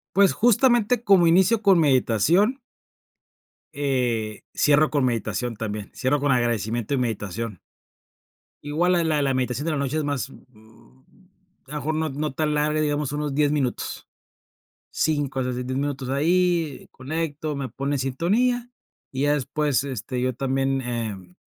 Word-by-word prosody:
Pues, 195 -1 +5
justamente, 240 0 +3
como 190 -5 +5
inicio 190 +6 +4
con 195 -3 +5
meditación 160 - +3 1.1
eh, 125 -6 -1
cierro 150 +1 +4
con 145 -3 +1
meditación 120 0 -1
también, 105 -1 -5
cierro 140 +3 0
con 140 -1 +2
agradecimiento 120 0 0
y - - +1
meditación. 110 -3 -3 1.1
Igual 160 +5 +1
la 175 -1 +3
la 155 -2 +1
la 135 -1 +1
meditación 130 +2 -1
de - - 0
la 150 - -1
noche 140 +1 -1
es 155 - 0
más, 140 -2 -2
mm, 110 -4 -19 0.8
a - - -15
lo - - -4
mejor 155 +2 -2
no 160 0 0
no 150 +2 -3
tan 155 +1 0
larga, 150 +1 +1
digamos, 150 -2 0
unos 150 -1 -2
10 145 0 +2
minutos, 135 -5 -2 0.8
5 145 -4 -1
hasta 125 0 -1
10 125 0 -4
minutos, 140 -2 -3
ahí, 165 +1 +1
conecto, 155 +2 -4
me 140 -2 -4
pone 140 +4 -2
en - - -3
sintonía, 220 - 0 0.4
y 135 0 -2
ya 145 0 +3
después, 145 0 0
este, 130 -1 -4
yo 130 0 +1
también, 135 +1 0
em, 110 -7 -5
140 Hz, 155 wpm, -24 LUFS, 125-155 Hz, 1.1 s, Pues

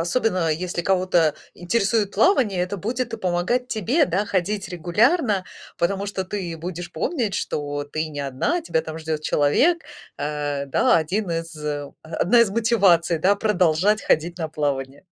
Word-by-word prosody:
особенно 180 -2 +1
если 175 +2 -2
кого-то 180 -4 +2 0.2
интересует 200 +3 0
плавание, 210 - +3
это 180 +3 -3
будет 230 +4 -3
помогать 185 +8 0
тебе, 235 - +2
да, 185 +4 0
ходить 200 +1 -1
регулярно, 205 - +1 0.3
потому 195 +3 0
что 190 -2 -3
ты 180 -4 -4
будешь 175 +1 -6
помнить, 235 - -1
что 145 -1 -3
ты 155 +2 -3
не 145 -2 -6
одна, 140 - -1
тебя 160 - 0
там 160 0 -7
ждет 155 -1 -3
человек. 265 - +3 0.4
Э, 145 -1 -2
да, 135 - +3
один 180 +4 -1
из 165 0 -3 0.5
одна 175 +8 +2
из 230 - +4
мотиваций, 195 -7 +3
да, 195 +5 +3
продолжать 200 0 +2
ходить 170 +3 +1
на 160 -2 -2
плавание. 140 0 -3
180 Hz, 145 wpm, -23 LUFS, 160-210 Hz, 0.5 s, из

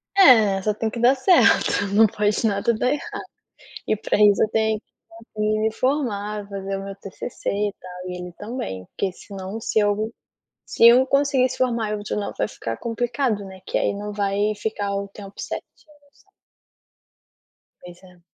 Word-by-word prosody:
É, 220 - +6
só 210 +2 0
tem 220 +1 -2
que 235 - -6
dar 250 +3 +5
certo, 260 - +4
não 220 +1 +6
pode 210 +2 0
nada 200 +3 +1
dar 245 +3 0
errado. 295 - -1 0.9
E 215 - +1
para 215 - -1
isso 205 -1 +5
eu - - +3
tenho 220 -1 +1
que - - -57 0.3
fazer 215 -1 -2
me 220 0 +1
formar, 210 -6 -2
fazer 195 -1 -4
o 195 - -7
meu 195 0 -6
T-C-C 195 +4 -6
e 205 0 -1
tal, 180 0 -8
e 180 - -5
ele 180 0 -7
também, 205 - -5
porque 195 - -3
senão 195 +3 -8
se 220 - 0
eu 210 +2 0 0.5
se 230 - +4
eu 245 +2 +8
conseguir 275 -1 +2
se - - -6
formar 235 -4 0
eu 210 - -2
de 205 - -4
lá 210 - -3
vai - - 0
ficar 115 - -5
complicado, 235 -2 -1
né, 190 -1 -11
que - - -2
aí - - 0
não 210 +1 -5
vai 205 +1 0
ficar 205 -1 -3
o 200 0 -3
tempo 200 0 -11
certinho - - -5 0.5
sabe. 400 - -28 1.5
Pois 175 0 -13
é. 180 -1 -18
210 Hz, 185 wpm, -23 LUFS, 200-230 Hz, 1.5 s, eu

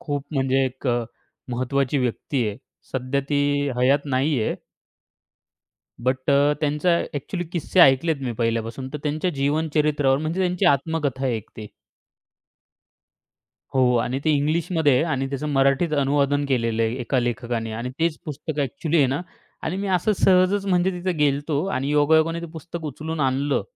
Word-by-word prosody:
खूप 145 -1 -3
म्हणजे 135 0 +2
एक 130 +1 -5
अ, 120 -1 +1 0.5
महत्त्वाची 130 +3 0
व्यक्ती 125 0 -1
आहे. 105 - -5 0.4
सध्या 130 +1 -1
ती 145 - +1 0.4
हयात 135 +3 +3
नाहीये. 135 -3 0 1.5
बट 130 +2 0
अ, 140 +1 +4
त्यांचा 150 +3 +2
अ‍ॅक्चुअली 165 +5 -4
किस्से 175 +1 +1
ऐकलेत 150 +3 +5
मी 125 -2 -2
पहिल्यापासून 115 +2 -2
तर 150 - -4
त्यांच्या 155 +4 -1
जीवन 145 +4 0
चरित्रावर 145 -3 +2
म्हणजे 160 +5 -2
त्यांची 180 +1 0
आत्मकथा 140 -3 +1
आहे 125 -3 +1
एक 110 - -9
ती. 110 - -7 2.1
हो, 125 -1 +4
आणि 125 +3 0
ते 155 - +3
इंग्लिशमध्ये 155 +1 +1
आहे, 125 - +3
आणि 135 -5 -1
त्याचं 140 +2 -3
मराठीत 135 +4 +2
अनुवादन 140 +1 +1
केलेलं 115 -4 +1
आहे 115 +1 0
एका 125 +2 0
लेखकाने 120 -1 -2
आणि 120 +3 -4
तेच 165 -1 0
पुस्तक 150 0 -6
अ‍ॅक्चुअली 150 +4 -1
आहे, 140 - +5
ना 135 +5 -1 0.4
आणि 175 - -2
मी 200 +1 -3
असं 215 +5 +1
सहजच 190 +2 +4
म्हणजे 185 0 +2
तिथे 180 +1 -2
गेलो 145 -2 +3
होतो 145 +1 -2
आणि 140 -7 -2
योगायोगाने 160 +3 +3
ते 170 - -6
पुस्तक 165 0 -8
उचलून 155 +2 -4
आणलं. 135 0 +1
145 Hz, 155 wpm, -23 LUFS, 130-160 Hz, 2.1 s, ऐकलेत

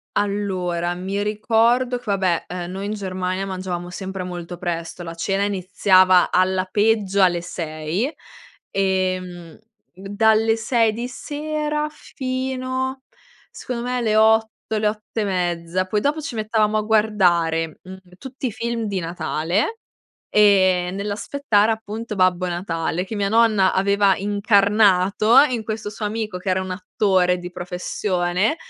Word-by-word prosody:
Allora, 185 -4 -1
mi 190 +3 -3
ricordo 230 +4 +2
che, 245 - -14
vabbè, 190 -4 0
ehm, 180 0 -5
noi 195 +2 -5
in 210 - -2
Germania 185 -1 -3
mangiavamo 185 -2 -5
sempre 190 0 -5
molto 175 -1 -7
presto. 175 0 -4
La 165 -1 -6
cena 195 +4 -1
iniziava, 185 -1 +3
alla 185 0 +2
peggio, 205 0 +1
alle 175 -2 +3
6 165 - -3 0.6
e, 190 -1 +1
mhmm, 175 -3 -11 0.3
dalle 220 +4 +2
6 225 -1 +1
di 235 +3 -4
sera, 300 +3 -3
fino, 260 -1 -4 0.5
secondo 235 -2 -5
me, 250 +1 -2
alle 225 -3 0
8, 220 0 +2
le 210 0 +1
8 215 +1 -4
e - - +1
mezza, 175 -1 -1
poi 205 +2 -1
dopo 295 +5 0
ci 305 -3 -6
mettevamo 215 -1 +1
a - - +1
guardare, 180 -7 +1
mhmm, 185 +1 -10 0.2
tutti 265 +4 -5
i - - -3
film 235 0 -3
di 200 -3 -2
Natale, 175 - -2 0.5
ehm, 185 -3 +4
nell'aspettare, 210 +2 0
appunto, 220 0 -5
Babbo 185 -1 +2
Natale 175 -1 -2
che 215 +3 -6
mia 200 -1 0
nonna 215 -3 +3
aveva 200 0 +3
incarnato 205 0 +3
in 235 -3 -3
questo 215 -1 -4
suo 210 0 -4
amico 215 -3 -3
che 180 - -7
era 185 0 +1
un 185 - -6
attore 185 -1 +1
di 180 0 -7
professione. 180 - -1
200 Hz, 140 wpm, -21 LUFS, 180-220 Hz, 0.6 s, ehm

